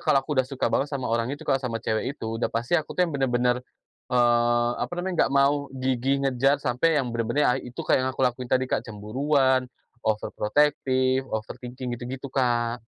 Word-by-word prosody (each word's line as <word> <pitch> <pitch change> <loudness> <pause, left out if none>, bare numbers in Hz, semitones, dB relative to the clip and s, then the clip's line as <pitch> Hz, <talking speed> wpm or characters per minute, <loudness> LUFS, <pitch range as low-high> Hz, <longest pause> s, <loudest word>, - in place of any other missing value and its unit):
kalau 135 - +3
aku 150 - -3
udah 130 - -4
suka 135 -2 -1
banget 140 - +1
sama 130 -5 -3
orang 115 +1 +1
itu, 145 +1 -6
Kak, 135 -2 +1
sama 120 -3 -3
cewek 115 +5 -2
itu, 115 +1 -4
udah - - +1
pasti 115 +6 -3
aku 160 -3 0
tuh 180 - +4
yang 165 - -4
benar-benar, 125 -2 +1 0.5
eee, 120 -1 +3
apa - - -3
namanya, 180 +1 -2
nggak - - -6
mau 140 0 +3
gigih, 130 +2 0
ngejar 135 +2 +3
sampai 145 +4 +1
yang 125 -4 0
benar-benar 120 +3 +1
ae - - -9
itu 125 - -8
kayak - - +3
yang 130 0 0
aku 130 - +2
lakuin 125 0 -1
tadi, 130 0 +2
Kak, 130 - -1
cemburuan, 130 +4 0 0.3
overprotective, 130 +4 +1
overthinking, 125 +3 -5
gitu-gitu, 130 +2 -6
Kak. 120 -3 0
130 Hz, 190 wpm, -25 LUFS, 120-140 Hz, 0.5 s, tuh